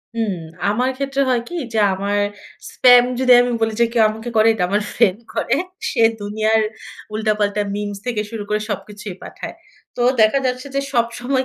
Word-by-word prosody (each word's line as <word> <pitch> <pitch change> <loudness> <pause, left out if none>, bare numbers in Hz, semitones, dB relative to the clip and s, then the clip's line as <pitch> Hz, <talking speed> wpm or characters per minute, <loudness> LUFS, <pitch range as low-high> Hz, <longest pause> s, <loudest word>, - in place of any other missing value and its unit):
হুম, 220 -5 -1 0.3
আমার 245 +5 +1
ক্ষেত্রে 275 0 -1
হয় 245 -2 +2
কি? 350 - -6 0.2
যে 220 - +1
আমার 200 +2 -1 0.5
স্পাম 245 -1 +7 0.2
যদি 260 -1 +3
আমি 245 0 0
বলি, 225 -1 +1
যে 235 - +6
কেউ 230 -2 +4
আমাকে 220 +2 -6
করে, 220 +1 +5
এটা 205 -5 -1
আমার 205 +2 +1
ফ্রেন্ড 190 +2 +2
করে। 250 - 0 0.3
সে 235 - -1 0.2
দুনিয়ার 215 +2 +1 0.5
উল্টা-পাল্টা 210 -1 0
মিমস 205 -1 -4
থেকে 230 -4 -1
শুরু 220 -2 -5
করে 210 0 +1
সবকিছুই 205 -1 -6
পাঠায়। - - -8 0.4
তো - - -3 0.2
দেখা 215 +6 +4
যাচ্ছে 255 +1 -2
যে, - - +2
সবসময় 245 +2 0
220 Hz, 175 wpm, -20 LUFS, 210-245 Hz, 0.5 s, স্পাম